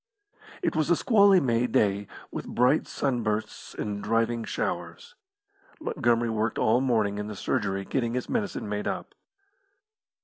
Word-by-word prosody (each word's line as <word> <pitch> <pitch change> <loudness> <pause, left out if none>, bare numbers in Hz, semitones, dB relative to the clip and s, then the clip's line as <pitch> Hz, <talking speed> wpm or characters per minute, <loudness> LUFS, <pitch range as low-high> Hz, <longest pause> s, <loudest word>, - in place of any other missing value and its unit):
It 340 - 0
was 155 0 +1
a 175 - +5
squally 200 -2 +5
May 125 -4 +1
day, 100 -3 +1 0.2
with - - -5
bright 125 +5 +2
sunbursts 115 -6 -2
and 105 -1 -4
driving 115 +1 +1
showers. 475 +1 -4 0.7
Montgomery 120 - +1
worked 110 +1 -1
all 115 +4 +3
morning 110 -6 +1
in 105 - -4
the 105 - -6
surgery 95 0 -1
getting 120 0 -1
his 125 - -2
medicine 205 - -2
made 105 0 -3
up. - - -4
115 Hz, 140 wpm, -27 LUFS, 105-135 Hz, 0.7 s, a